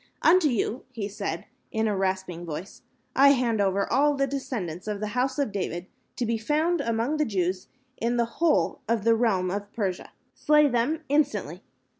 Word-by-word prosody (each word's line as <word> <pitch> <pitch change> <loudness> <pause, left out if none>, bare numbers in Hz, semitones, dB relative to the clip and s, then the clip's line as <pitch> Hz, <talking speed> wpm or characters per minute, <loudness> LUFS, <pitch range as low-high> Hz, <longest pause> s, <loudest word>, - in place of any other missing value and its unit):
"Unto 340 -1 +6
you," 235 0 -1
he 220 -5 -4
said, 200 -5 -4 0.3
in 220 0 0
a 210 - 0
rasping 190 -2 -2
voice, 170 +4 -7 0.3
"I 280 +1 +7
hand 235 -5 +1
over 195 0 +1
all 290 +3 +4
the 275 0 +1
descendants 220 - -4
of 210 -1 -2
the 215 0 -3
House 260 +2 0
of 280 -7 0
David 185 -3 -3 0.3
to 245 - -1
be 230 0 -1
found 310 +7 +1
among 235 +5 0
the 305 - +2
Jews 185 -3 -1 0.3
in 235 +1 0
the 235 - +3 0.2
whole 335 -2 +2
of 230 -3 +1
the 230 +1 +5
realm 205 -6 +1
of 205 +1 -4
Persia. 190 -5 -3 0.2
Slay 300 0 +4
them 275 +6 0
instantly. 290 0 0
230 Hz, 180 wpm, -26 LUFS, 195-275 Hz, 0.3 s, I